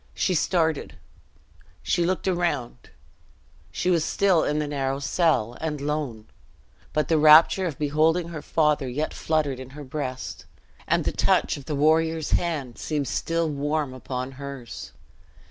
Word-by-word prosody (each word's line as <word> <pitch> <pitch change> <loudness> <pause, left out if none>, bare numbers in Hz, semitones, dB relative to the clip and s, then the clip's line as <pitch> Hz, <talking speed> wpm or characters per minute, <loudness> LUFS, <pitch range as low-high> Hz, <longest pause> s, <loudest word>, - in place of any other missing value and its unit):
She 185 - +1
started 160 -2 0 0.9
she 170 -1 +1
looked 185 +1 -1
around 175 -9 -2 0.8
she 185 - 0
was 170 -3 +2
still 185 -1 +2
in 150 - 0
the 150 - 0
narrow 135 -2 -1
cell, 135 -5 +1
and 155 -2 -2
lone; 140 -7 -3 0.7
but 150 - 0
the 160 -2 +3
rapture 155 +5 +7
of 150 -6 -5
beholding 160 +4 +1
her 160 -3 -6
father 150 -5 +1
yet 150 +5 -2
fluttered 150 -5 -1
in 130 -1 -8
her 150 - -7
breast, 130 - -5 0.4
and - - +2
the - - +1
touch - - +2
of 140 - -10
the 150 - -3
warrior's 160 +2 +2
hand 150 -9 -1
seemed 150 -3 -2
still 165 +5 -1
warm 145 -1 -1
upon 130 0 -5
hers. 135 -3 -8
150 Hz, 145 wpm, -25 LUFS, 135-160 Hz, 0.9 s, rapture